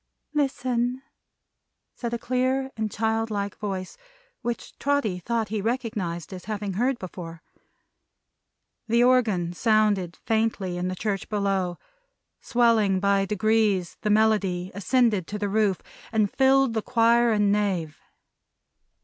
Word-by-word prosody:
"Listen!" 255 -3 0 0.9
said 235 -2 -5
a 235 - -1
clear 255 +2 0
and 220 -1 -2
child 225 +1 0
like 200 -2 -3
voice, 190 -3 -4 0.4
which 240 -1 -4
Trotty 275 -10 0
thought 225 +2 -2
he 215 -1 -2
recognized 210 -7 -3
as 180 -1 -9
having 205 -2 -3
heard 245 +6 +1
before. 175 -4 -8 1.4
The 235 +2 +3
organ 220 -9 +2
sounded 210 -4 +1
faintly 220 -5 0
in 180 +1 -2
the 185 - -3
church 200 0 -3
below. 195 -4 0 0.6
Swelling 225 -5 +3
by 200 0 +2
degrees, 210 -3 +1
the 210 - -1
melody 205 -4 +2
ascended 210 -2 +1
to 210 - -4
the 205 -1 -2
roof, 205 -2 +1 0.3
and 215 -3 +1
filled 270 -2 +4
the 220 - 0
choir 235 0 +3
and 210 -2 +3
nave. 190 -7 -1
215 Hz, 125 wpm, -25 LUFS, 195-235 Hz, 1.4 s, filled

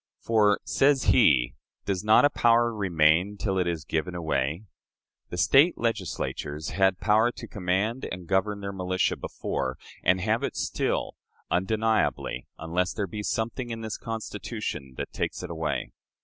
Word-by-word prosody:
For 105 -3 +3
(says 135 -1 +3
he) 65 - +4 0.3
does 95 -2 -1
not 110 +6 +6
a 145 - +4
power 120 -1 +3
remain 90 -1 +2
till 95 -2 -1
it 90 - +1
is 85 -3 -2
given 85 +3 -2
away? 80 0 -1 0.7
The 90 - -6
State 135 - +5
Legislatures 90 -8 -3
had 95 -1 +2
power 110 +3 +3
to - - -9
command 100 +5 -1
and 90 -1 -6
govern 100 +3 0
their 100 0 -4
militia 95 -1 0
before, 65 -1 -4 0.3
and 95 - +3
have 110 +4 +1
it - - -3
still, - - -1 0.4
undeniably, 110 - 0
unless 90 +2 -1
there 105 - -2
be 105 +3 -6
something 115 +4 -2
in 115 -1 -5
this 110 -2 -5
Constitution 105 - -5
that - - -5
takes - - -3
it - - -6
away.... 80 -1 -3
100 Hz, 150 wpm, -27 LUFS, 85-110 Hz, 0.7 s, not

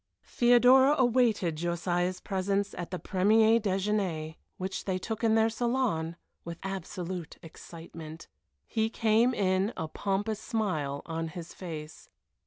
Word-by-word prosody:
Theodora 250 +3 +5
awaited 235 - +2
Josiah's 175 +2 -1
presence 195 +1 -1
at 175 - -6
the 180 - -3
premier 220 +5 +3
déjeuner, 190 -6 -1 0.2
which 190 +1 -4
they 190 -2 0
took 220 +4 -5
in 225 -1 +4
their 220 0 +4
salon, 225 -9 -1 0.3
with 170 0 -7
absolute 185 -2 -5
excitement. 165 -1 -10 0.4
He 220 -1 0
came 230 +2 +2
in, 190 +1 +1
a 160 - -3
pompous 205 +5 -2
smile 160 -12 -2
on 165 0 -3
his 165 +1 -8
face. 160 -4 -8
190 Hz, 125 wpm, -29 LUFS, 170-220 Hz, 0.4 s, Theodora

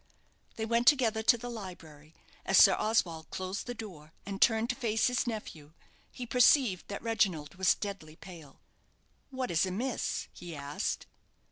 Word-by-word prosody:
They 220 - -3
went 235 +1 0
together 235 -6 +4
to 235 +2 +4
the 245 +2 -8
library. 165 -9 -10 0.3
As - - +2
Sir - - +8
Oswald 170 -7 0
closed 190 +4 -5
the 245 - -4
door, 165 -9 -10
and 195 -1 -6
turned 225 +1 +3
to - - -6
face 225 -4 0
his 250 0 0
nephew, 160 -10 -6 0.4
he 250 - -7
perceived 240 - +3
that 200 - -6
Reginald 190 -10 0
was 190 -1 +3
deadly 190 -7 -7
pale. 165 -6 -13 0.7
"What 260 -2 -4
is 160 -2 +2
amiss?" 220 +7 -2
he 175 -2 -9
asked. 140 0 -4
205 Hz, 155 wpm, -30 LUFS, 165-235 Hz, 0.7 s, Sir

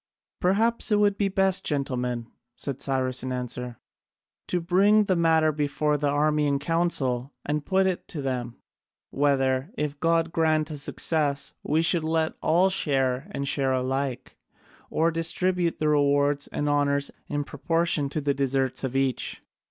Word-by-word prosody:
"Perhaps 225 +6 +1
it 210 - +4
would 205 -1 +3
be 200 -1 +1
best, 195 -1 +2
gentlemen," 125 -5 -2 0.3
said 140 -1 -4
Cyrus 130 -2 -1
in 130 +1 -4
answer, 125 -1 -4 0.7
"to 180 - 0
bring 195 +5 +4
the 190 -2 +1
matter 160 -2 +3
before 150 0 0
the 145 0 0
army 150 +1 +2
in 140 -1 +1
council 140 -5 -1
and 150 0 -2
put 190 0 +3
it 185 -2 -2
to 155 - -6
them, 125 -3 -3 0.6
whether, 135 0 +1
if 145 -1 -3
God 165 0 +1
grant 160 -2 +1
us 150 -2 -5
success, 145 -1 0
we 155 +3 +1
should 165 -1 +2
let 160 0 0
all 180 +4 +3
share 135 -3 0
and 140 -8 -4
share 135 -1 +1
alike, 130 0 -2 0.5
or 165 +1 +1
distribute 170 +1 0
the 155 - 0
rewards 145 -1 +2
and 145 - -3
honours 140 -1 +1 0.2
in 145 0 -2
proportion 160 0 -1
to 155 - -3
the 140 0 +1
deserts 135 -1 -1
of 130 -1 -3
each." 135 -2 -1
145 Hz, 155 wpm, -26 LUFS, 135-165 Hz, 0.7 s, it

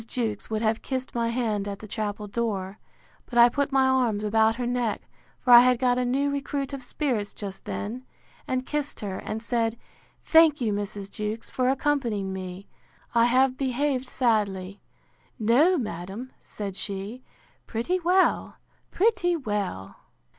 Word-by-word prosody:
Jewkes 225 -5 -2
would 220 0 -1
have 220 0 +1
kissed 260 -1 -4
my 235 -1 0
hand 220 -4 -1
at 200 -1 -4
the 215 - -10
chapel 210 0 -3
door; 205 -2 -3 0.5
but 240 - -4
I 240 0 +8
put 285 +3 -1
my 270 -1 +4
arms 245 -5 +2
about 220 +1 +3
her 245 0 -3
neck, 240 -3 -1 0.3
for 250 - +4
I 240 - +12
had 250 0 +5
got 250 0 +2
a 250 - +1
new 275 +3 +1
recruit 280 -1 -3
of 275 - -5
spirits 245 -5 -2
just 195 -2 -7
then; 235 +5 -4 0.4
and 255 0 -1
kissed 295 0 -3
her, 195 -3 -4
and 220 +1 -5
said, 230 -1 0 0.5
Thank 320 -2 +6
you, 225 -5 0
Mrs. 200 -1 -5
Jewkes, 215 +2 -5
for 255 0 +1
accompanying 250 -8 0
me. 185 +1 -7 0.5
I 235 0 +5
have 255 +2 +3
behaved 265 0 0
sadly. 205 -6 0 0.6
No, 270 - +4
madam, 210 - -5
said 200 -3 -6
she, 200 +5 -4 0.5
pretty 240 +12 -1
well, 365 +2 +2 0.3
pretty 360 -4 +2
well! 205 - -3
235 Hz, 155 wpm, -26 LUFS, 205-260 Hz, 0.6 s, I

